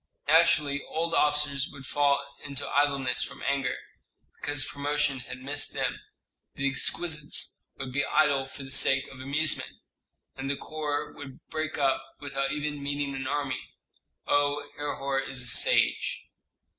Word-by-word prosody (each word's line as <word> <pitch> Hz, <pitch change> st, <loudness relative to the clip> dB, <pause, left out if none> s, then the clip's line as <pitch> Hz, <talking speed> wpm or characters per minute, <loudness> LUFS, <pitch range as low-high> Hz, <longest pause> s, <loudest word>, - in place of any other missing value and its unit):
Naturally 150 Hz, -2 st, +4 dB
old 165 Hz, +1 st, -1 dB
officers 150 Hz, -2 st, +3 dB
would 140 Hz, -, -10 dB
fall 140 Hz, 0 st, +2 dB, 0.2 s
into 140 Hz, -2 st, -3 dB
idleness 140 Hz, -3 st, +2 dB
from -, -, -6 dB
anger, 135 Hz, -1 st, 0 dB, 0.6 s
because 145 Hz, -1 st, 0 dB
promotion 145 Hz, -1 st, 0 dB
had 125 Hz, -, -8 dB
missed 145 Hz, +2 st, -2 dB
them; -, -, -1 dB, 0.6 s
the 140 Hz, -, 0 dB
exquisites 150 Hz, +3 st, 0 dB
would 130 Hz, -1 st, -6 dB
be 140 Hz, +1 st, +1 dB
idle 140 Hz, -3 st, +3 dB
for 140 Hz, -, -9 dB
the 135 Hz, -, -10 dB
sake 135 Hz, 0 st, +4 dB
of 135 Hz, -, -12 dB
amusement, 145 Hz, +4 st, +1 dB, 0.6 s
and 135 Hz, +1 st, -4 dB
the 140 Hz, -, 0 dB
corps 150 Hz, -2 st, -3 dB
would 135 Hz, -2 st, -11 dB
break 155 Hz, 0 st, -2 dB
up 135 Hz, -2 st, +2 dB, 0.2 s
without 140 Hz, -1 st, -2 dB
even 150 Hz, 0 st, -3 dB
meeting 140 Hz, 0 st, -2 dB
an 135 Hz, 0 st, -4 dB
enemy. 135 Hz, -2 st, -1 dB, 0.6 s
Oh, 145 Hz, 0 st, +1 dB
Herhor 140 Hz, -2 st, -1 dB
is 135 Hz, -1 st, -3 dB
a -, -, -2 dB
sage!" 115 Hz, -, +3 dB
140 Hz, 145 wpm, -28 LUFS, 135-145 Hz, 0.6 s, Naturally